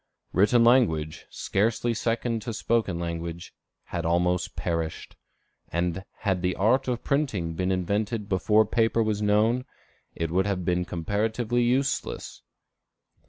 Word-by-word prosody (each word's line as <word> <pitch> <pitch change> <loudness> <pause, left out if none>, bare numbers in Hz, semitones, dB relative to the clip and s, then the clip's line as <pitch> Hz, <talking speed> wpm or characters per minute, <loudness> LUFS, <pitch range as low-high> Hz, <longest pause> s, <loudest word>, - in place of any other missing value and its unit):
Written 105 +6 +4
language, 95 -12 +2
scarcely 115 +4 0
second 115 0 -1
to 115 - -4
spoken 110 -5 0
language, 85 0 -5 0.3
had 85 - -4
almost 90 +2 +1
perished; 85 -2 -3 0.6
and 85 +2 -1 0.2
had 95 -4 0
the 90 -1 0
art 125 +7 +2
of 120 -2 -2
printing 120 - 0
been 90 +3 -1
invented 100 +4 -1
before 105 +2 +3
paper 115 +1 +2
was 105 -1 -1
known, 110 +4 +2 0.5
it 80 -1 -2
would 95 +3 +2
have 95 -3 -2
been 90 0 +1
comparatively 110 +7 -1
useless. 130 +3 -1
100 Hz, 125 wpm, -26 LUFS, 90-115 Hz, 0.6 s, Written